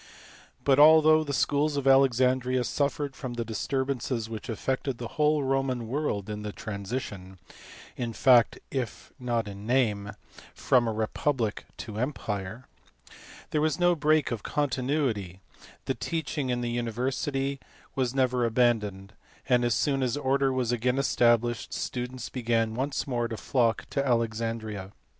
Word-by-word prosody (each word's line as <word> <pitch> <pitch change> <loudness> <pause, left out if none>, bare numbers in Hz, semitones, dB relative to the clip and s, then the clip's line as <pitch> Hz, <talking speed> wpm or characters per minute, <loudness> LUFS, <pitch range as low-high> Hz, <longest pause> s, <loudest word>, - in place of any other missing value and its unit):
But, 140 -1 +4
although 155 +1 +7
the 145 - -4
schools 145 +1 +1
at 140 - -2
Alexandria 130 -1 +3
suffered 140 +1 -1
from 125 -3 -6
the 120 -1 -3
disturbances 125 0 -2
which 110 +1 -6
affected 130 +3 -2
the 120 -1 -6
whole 150 -1 +2
Roman 135 -3 0
world 120 -6 -2
in 105 -1 -5
the 105 0 -4
transition, 100 -3 -6 0.6
in 120 -2 -3
fact 120 +1 +4
if 125 -5 -4
not 120 -3 -1
in 100 +1 -8
name, 105 -5 +1 0.4
from 120 -2 +2
a - - +1
republic 110 +1 -1
to 110 - -7
the 105 +2 -4
empire, 115 -4 -4 0.9
there 150 - +1
was 155 +2 +1
no 175 0 +4
break 155 -3 +2
of 115 -3 -3
continuity; 130 - -1 0.5
the - - 0
teaching 155 -4 -3
in 120 -1 0
the 120 -1 -2
university 130 +4 -2 0.3
was 130 -1 -1
never 125 -2 +2
abandoned; 110 -4 +1 0.3
and 125 -2 +3
as 120 -3 +2
soon 135 +3 +1
as 125 +1 0
order 135 -1 +1
was 130 -2 0
again 125 +2 0
established 120 -4 +2
students 125 0 -4
began 115 -3 0
once 135 +4 -2
more 120 -3 -1
to 115 - -5
flock 115 +2 +1
to 140 - 0
Alexandria. 115 -5 -2
125 Hz, 145 wpm, -28 LUFS, 115-135 Hz, 0.9 s, although